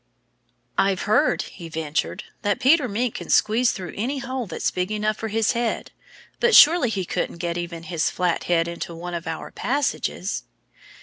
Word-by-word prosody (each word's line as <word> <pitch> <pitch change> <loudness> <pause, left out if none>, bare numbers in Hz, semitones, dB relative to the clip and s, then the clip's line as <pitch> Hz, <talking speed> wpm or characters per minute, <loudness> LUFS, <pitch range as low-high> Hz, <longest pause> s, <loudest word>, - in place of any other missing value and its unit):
"I've 195 -1 +2
heard," 215 - +2
he 170 -1 -10
ventured, 160 +5 -2 0.2
"that 205 -2 0
Peter 285 0 +4
Mink 235 +2 -1
can - - -7
squeeze 235 +3 +3
through 180 -5 -6
any 250 +7 -2
hole 255 -2 -4
that's 165 - -1
big 180 +2 -2
enough 215 0 0
for 225 - -4
his 220 0 +1
head. 235 -2 -2 0.5
But 475 -1 +4
surely 310 -5 +8
he 195 -4 -2
couldn't 170 - -2
get 170 0 -2
even 170 -1 -5
his 165 -1 0
flat 180 -2 -1
head 165 -1 +2
into 170 0 -5
one 175 +1 -6
of 170 -1 -5
our 160 -1 -5
passages." 280 +2 -2
205 Hz, 175 wpm, -23 LUFS, 170-240 Hz, 0.5 s, surely